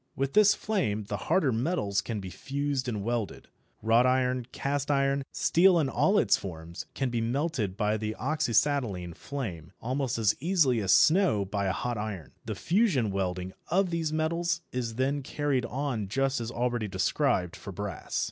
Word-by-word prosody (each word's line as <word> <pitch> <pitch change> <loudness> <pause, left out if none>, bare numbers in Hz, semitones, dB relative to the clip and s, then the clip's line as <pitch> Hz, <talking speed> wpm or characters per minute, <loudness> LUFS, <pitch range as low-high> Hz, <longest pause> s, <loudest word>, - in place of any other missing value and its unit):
With 135 0 -1
this 210 -1 +6
flame 175 - -1
the 100 +1 -4
harder 150 -8 +3
metals 115 - 0
can 110 0 -4
be 95 -2 -7
fused 140 +1 -2
and 105 -5 -2
welded. 115 -1 -3 0.3
Wrought 115 +3 +4
iron, 125 -1 +1
cast 140 +1 -2
iron, 140 -1 +2
steel 180 +1 +4
in 150 -5 +1
all 195 +9 +2
its 105 - +4
forms, 85 -1 -7
all - - -38
can 135 -3 -1
be 120 -1 0
melted 120 - -1
by 105 0 +1
the 110 0 -3
oxyacetylene 120 - 0
flame, 95 - -6
almost 130 0 -2
as 110 -3 +2
easily 160 -9 +2
as 95 -3 +1
snow 160 - +4
by 100 0 -2
a - - +2
hot 120 +3 -3
iron. 100 -9 -5
The - - -3
fusion 165 - +2
welding 95 -1 -2
of 185 +1 +1
these 165 -2 -1
metals 170 +2 0
is 120 -3 -3
then 135 +3 0
carried 140 -3 -1
on 125 -5 -2
just 135 +4 0
as 115 - -4
already 120 -2 -1
described 95 - 0
for 100 - -8
brass. 100 -1 -4
125 Hz, 175 wpm, -28 LUFS, 105-145 Hz, 0.3 s, this